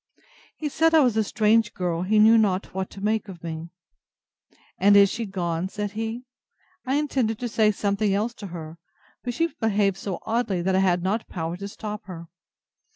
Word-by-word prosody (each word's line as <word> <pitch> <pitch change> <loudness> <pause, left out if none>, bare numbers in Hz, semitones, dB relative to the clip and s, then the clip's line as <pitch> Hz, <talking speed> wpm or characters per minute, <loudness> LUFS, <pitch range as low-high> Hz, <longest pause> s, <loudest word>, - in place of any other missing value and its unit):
He 310 - -3
said 325 +3 +2
I 315 - +7
was 250 -5 +3
a 220 - +3
strange 215 +1 +2
girl; 175 -2 -1
he 205 +4 +1
knew 220 +2 +7
not 200 -4 +1
what 190 0 -3
to 195 - -11
make 215 +1 0
of 175 -4 -10
me. 165 0 -6 1.1
And 200 +2 +6
is 200 -1 +6
she 230 -2 -3
gone? 175 -2 -2
said 205 0 -4
he: 225 +3 -4 0.6
I 265 - +1
intended 265 -7 0
to 245 - -3
say 220 -2 +3
something 200 0 0
else 215 +5 0
to 200 - -5
her; 165 -2 -8 0.4
but 245 -1 -3
she 330 +4 0
behaved 205 -3 +1
so 195 -3 -4
oddly, 220 -6 -1
that 190 +1 +1
I 190 - +3
had 180 -2 +2
not 210 +4 -1
power 165 -1 -4
to 200 +2 -6
stop 210 +1 -7
her. 170 -3 -9
205 Hz, 195 wpm, -25 LUFS, 185-225 Hz, 1.1 s, I